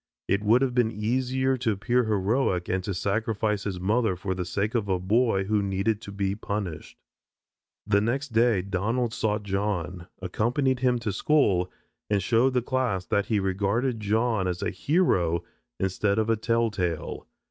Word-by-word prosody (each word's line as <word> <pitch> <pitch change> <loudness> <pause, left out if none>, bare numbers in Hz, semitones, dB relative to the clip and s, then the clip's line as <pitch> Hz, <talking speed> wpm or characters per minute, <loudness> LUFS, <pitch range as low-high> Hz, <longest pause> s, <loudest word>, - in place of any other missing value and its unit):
It 100 +1 +1
would 115 +5 +4
have 130 -2 0
been 120 -2 +3
easier 130 +4 0
to 120 -2 0
appear 120 +5 +1
heroic 105 -2 +1
and 95 0 -1
to 100 - -2
sacrifice 105 +1 -1
his 95 -3 -3
mother 105 +1 +1
for 95 +1 -3
the 90 -1 -3
sake 105 +5 -2
of 110 -5 -1
a 95 - +2
boy 100 +2 +2
who 105 +1 +1
needed 100 +2 0
to 100 - -8
be 100 -1 -1
punished." 100 -5 -5 0.9
The 100 -1 +3
next 135 +6 -1
day 115 -4 +3
Donald 110 +5 -1
sought 105 -2 -1
John, 95 -3 -2
accompanied 120 +8 0
him 125 -1 +2
to 115 -3 -2
school, 100 -6 +2 0.4
and 100 -3 +1
showed 125 +5 +2
the 125 - +2
class 125 -8 -1
that 100 - 0
he 110 -3 +1
regarded 100 +6 0
John 110 -1 +1
as 90 +1 -2
a 100 - -1
hero 90 - +1 0.4
instead 100 +2 0
of 110 +1 +2
a - - +3
tell 115 +1 +1
tale. 90 -5 -3
105 Hz, 170 wpm, -26 LUFS, 95-120 Hz, 0.9 s, would